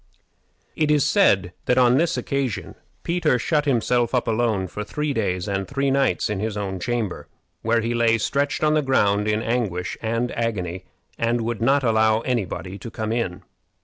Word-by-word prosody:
It 155 -1 +1
is 150 -2 +3
said 100 - +3
that 125 - +2
on 125 -1 +5
this 165 +4 +1
occasion 135 -7 -2 0.3
Peter 170 -6 +1
shut 150 +4 0
himself 120 -2 +1
up 125 - 0
alone 110 -4 +1
for 105 +4 -5
three 150 +6 -2
days 90 -6 -1
and 95 -1 -2
three 140 0 0
nights 135 0 +1
in 105 -2 -2
his 105 0 -3
own 95 -2 -3
chamber, 115 -2 -3 0.3
where 115 +1 +2
he 115 +2 -1
lay 115 -1 +3
stretched 140 +7 -1
on 155 0 +4
the 155 - +3
ground 105 -7 +2
in 105 +1 0
anguish 105 -7 -2
and 115 +2 -1
agony, 95 -6 -3 0.3
and 115 +1 +1
would 115 0 -3
not 135 +4 +3
allow 110 -1 +3
any 120 -4 0
body 95 +3 -7
to 115 - -7
come 110 -1 -4
in. 115 -7 -2
115 Hz, 180 wpm, -23 LUFS, 105-135 Hz, 0.3 s, on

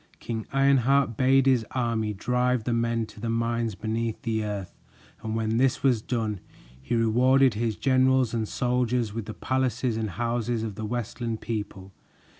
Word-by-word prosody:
King 110 -2 -5
Ironheart 135 -2 +3
bade 135 +3 +4
his 130 -4 +3
army 115 -4 -1
drive 125 +3 0
the 120 - -1
men 115 -1 0
to 110 - -14
the 115 +2 -3
mines 115 -1 -1
beneath 110 +2 -2
the 110 -2 -1
earth, 100 -3 -6 0.4
and 110 0 -3
when 110 0 0
this 135 +2 +2
was 125 -5 +3
done, 110 -4 -2 0.4
he 65 - -2
rewarded 125 +3 +4
his 110 0 -1
generals 130 +1 +2
and 110 -2 -1
soldiers 125 -3 0
with 115 -2 -4
the 110 - -7
palaces 130 -2 -1
and 110 -1 -2
houses 120 +2 -1
of 110 -2 -4
the 110 +2 -5
Westland 115 0 -3
people. 105 -3 -5
115 Hz, 165 wpm, -26 LUFS, 110-125 Hz, 0.4 s, bade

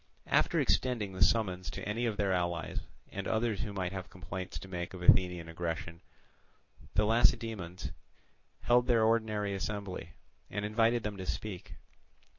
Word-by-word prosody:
After - - +3
extending 115 -7 +1
the 95 - -6
summons 95 -3 +2
to - - -6
any 115 +3 0
of 110 -3 -2
their 100 -2 +2
allies 85 -1 -1 0.3
and 100 0 -4
others 110 -2 +1
who 110 -4 -3
might 95 -3 -2
have 95 -2 -6
complaints 95 0 -6
to 95 - -8
make 90 0 -4
of 90 - -7
Athenian 90 -2 +5
aggression, 80 0 -4 0.9
the 105 - +4
Lacedaemonians 110 - +1 0.7
held 120 0 +4
their 115 -3 +4
ordinary 110 -2 +2
assembly, 95 -4 -4 0.4
and 105 +1 -2
invited 115 +2 +2
them 105 -2 -3
to 95 - -5
speak. 90 +4 -5
100 Hz, 150 wpm, -32 LUFS, 90-110 Hz, 0.9 s, Athenian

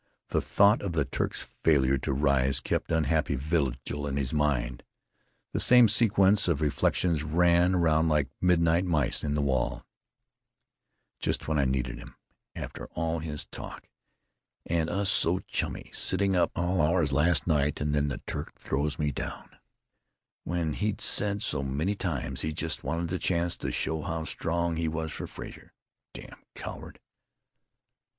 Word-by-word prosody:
The - - +1
thought 100 +2 +4
of 95 -4 -3
the 75 -4 +1
Turk's - - -2 0.2
failure 70 -4 +3
to - - -2
rise 70 -1 +2
kept - - -2
unhappy 80 -2 +1
vigil 70 -1 -2
in 70 -1 -2
his 65 -1 -2
mind. 70 -5 0 0.7
The - - 0
same 125 -1 +7
sequence 105 -2 +4
of 85 -5 +1
reflections 75 +2 +1
ran 85 +3 +3
around 80 -2 +3
like 75 -2 +2
midnight 85 -1 +3
mice 80 -8 0
in 75 -1 -1
the 75 - 0
wall: 65 -3 -1 1.3
"Just - - -1
when 80 -1 +1
I 70 - +3
needed 65 -2 -1
him.... - - -12 0.4
After - - -7
all 80 0 -1
his 75 -2 -5
talk.... - - -9 0.8
And 80 -1 0
us 100 +2 0
so 90 -3 +3
chummy, - - -3
sitting 100 -1 +2
up 90 -1 +2
all 90 +1 +1
hours 80 -2 +2
last 75 +1 +3
night. 75 -3 +1
And 75 0 -1
then 75 0 +1
the 70 - -5
Turk - - -6
throws 70 +2 -2
me 75 -1 0
down.... - - -7 0.9
When 85 -2 -2
he'd 105 +4 -2
said 105 0 +1
so 75 - -1
many 70 +9 -1
times 70 -9 -3
he 80 - -2
just 80 0 -3
wanted 85 0 -2
the 90 +1 -2
chance 85 -1 0
to - - -4
show 80 -1 -1
how 80 0 -3
strong 85 +1 -1
he 80 0 -1
was 80 0 -3
for - - -5
Frazer.... - - -10 0.4
Damn - - -11
coward! - - -8
80 Hz, 160 wpm, -28 LUFS, 70-85 Hz, 1.3 s, same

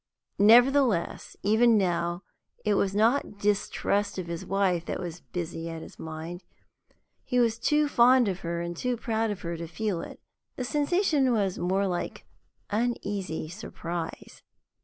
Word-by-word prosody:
Nevertheless, 240 -2 +4
even 220 +2 +5
now, 175 -1 0 0.4
it 210 - +3
was 195 -1 +1
not 220 0 +2
distrust 205 0 0
of 185 - -3
his 170 0 -5
wife 190 -3 +1
that - - -3
was 175 -2 -6
busy 165 -1 -5
at 165 -1 -6
his - - -13
mind 160 +3 -7 0.8
he 250 - -1
was 230 -2 +2
too 300 +3 +2
fond 250 -2 +5
of 190 -2 -2
her 170 -2 -3
and 170 0 -4
too 250 +7 -1
proud 225 -1 -1
of 205 - -4
her 170 0 -4
to 165 0 -6
feel 185 +1 -2
it - - -9 0.4
the 255 - -3
sensation 295 0 +2
was 200 -5 0
more 190 +3 +1
like 180 -2 -3 0.5
uneasy 200 -7 -2
surprise. 170 -2 -6
200 Hz, 150 wpm, -27 LUFS, 170-235 Hz, 0.8 s, even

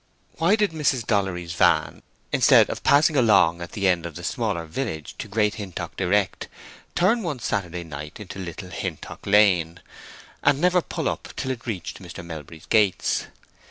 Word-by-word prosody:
Why 170 +6 +4
did 210 -3 +1
Mrs. 140 -7 0
Dollery's 95 -5 -1
van, 85 - +2 0.3
instead - - +5
of - - -5
passing 150 +2 +4
along 105 -9 +4
at 85 - -7
the 100 -2 0
end 85 -2 +1
of 85 - -11
the - - -8
smaller 85 -1 -2
village 80 - -4
to - - -5
Great 105 0 +1
Hintock 90 -4 -6
direct, 95 +1 0 0.5
turn 205 +7 +3
one 160 -8 -3
Saturday 90 -6 -3
night 75 -1 -8
into 100 -1 -8
Little 90 +1 -7
Hintock 90 -6 -6
Lane, 90 -5 +4 0.6
and 140 -1 +3
never 180 +2 +3
pull - - -4
up - - -3
till 130 - -2
it 125 -1 -7
reached 95 -4 -5
Mr. 85 -1 -9
Melbury's 80 -1 -9
gates? 105 -5 +2
100 Hz, 165 wpm, -24 LUFS, 85-130 Hz, 0.6 s, instead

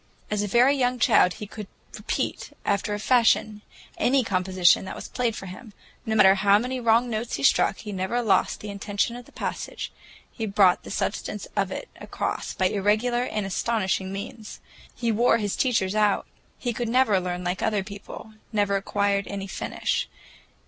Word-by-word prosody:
As 210 -1 +1
a 205 - -1
very 245 +7 +4
young 250 -2 +1
child 180 -5 +4
he 210 - -7
could 210 0 -8 0.3
repeat, - - -3
after 205 +1 0
a - - -5
fashion, 220 -2 +3 0.4
any 265 +1 +3
composition 185 -3 +3
that - - -6
was - - -7
played 240 -3 -1
for 195 - -7
him. 205 +4 -10 0.3
No 220 - 0
matter 190 -3 +7
how 200 +1 +4
many 250 +4 -2
wrong 235 +1 +3
notes 230 0 -3
he 140 - -5
struck, 195 - +3
he 210 - -7
never 195 +6 -1
lost 210 -4 +2
the 210 - -6
intention 205 +3 -2
of 245 -1 -10
a - - -20
passage, - - -5 0.4
he 225 -2 -4
brought 195 -3 +4
the - - -11
substance - - -3
of - - 0
it - - -5
across - - -4
by 185 - +1
irregular 215 +6 +1
and 210 -4 -3
astonishing 190 -2 -1
means. 210 +2 -7 0.4
He 235 -2 0
wore 230 +2 +3
his 205 -3 -2
teachers 215 -7 +1
out. 210 -1 +2 0.3
He 245 -2 -2
could 235 0 -3
never 235 -5 +3
learn 180 0 -4
like 180 +1 -2
other 210 -3 0
people, 200 +2 -10 0.2
never 205 -2 +1
acquired 200 0 0
any 200 -1 -5
finish. 195 - -2
210 Hz, 180 wpm, -25 LUFS, 195-235 Hz, 0.4 s, matter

